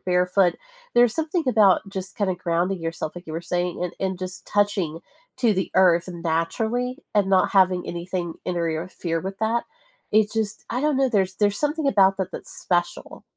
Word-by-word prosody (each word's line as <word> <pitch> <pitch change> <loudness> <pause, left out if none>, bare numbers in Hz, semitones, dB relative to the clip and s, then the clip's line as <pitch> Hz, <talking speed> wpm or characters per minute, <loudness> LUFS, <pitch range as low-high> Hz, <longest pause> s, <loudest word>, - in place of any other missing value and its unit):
barefoot. 180 0 +2 0.4
There's 240 -1 +5
something 320 +2 -1
about 210 -6 +5
just 190 -1 -6
kinda 195 -3 0
grounding 175 +1 -1
yourself, 165 -1 -4
like 175 - -9
you 160 - -7
were 165 - -3
saying, 175 0 -2
and 180 - -2
and 190 -1 -1
just 185 0 -7
touching 195 -6 0 0.4
to 235 -4 +3
the 190 0 -2
earth 180 -2 +4
naturally 200 - -1 0.2
and 205 -2 +3
not 190 -1 +3
having 185 -2 +3
anything 175 -1 -4
interfere 170 0 -2
with 195 +2 -6
that. 225 +2 0 0.5
It 215 0 +3
just 220 -2 -2
I 250 - -1
don't 300 -1 +1
know. 270 0 +3
There's 190 -5 0
there's 205 -1 +1
something 295 0 0
about 195 -6 +4
that 190 -1 -2
that's - - -8
special. 175 -1 -2
190 Hz, 175 wpm, -24 LUFS, 175-215 Hz, 0.5 s, There's